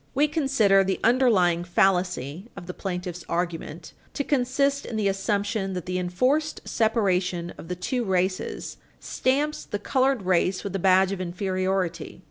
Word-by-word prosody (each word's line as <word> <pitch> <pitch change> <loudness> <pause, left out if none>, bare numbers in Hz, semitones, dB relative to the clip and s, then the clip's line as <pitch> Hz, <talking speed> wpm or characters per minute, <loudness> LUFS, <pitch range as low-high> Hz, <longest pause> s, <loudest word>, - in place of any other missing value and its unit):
We 290 +3 +4
consider 270 -11 +3
the 190 0 -1
underlying 210 -9 +3
fallacy 180 - 0
of 185 - -8
the 180 - -6
plaintiff's 180 -2 -5
argument 170 -1 -4 0.2
to 285 - 0
consist 275 +1 +1
in 230 - -6
the 215 -2 +1
assumption 200 0 -1
that 180 -3 -5
the 185 0 -2
enforced 255 - 0
separation 185 -6 0
of - - -11
the 180 - -3
two 240 +8 -2
races 185 -2 -2 0.2
stamps 290 +4 -1
the 205 - -4
colored 260 +1 +1
race 185 +1 +1
with 200 -2 -4
a - - 0
badge 190 +1 +4
of 195 -2 -3
inferiority. 185 0 -2
195 Hz, 150 wpm, -25 LUFS, 180-240 Hz, 0.2 s, We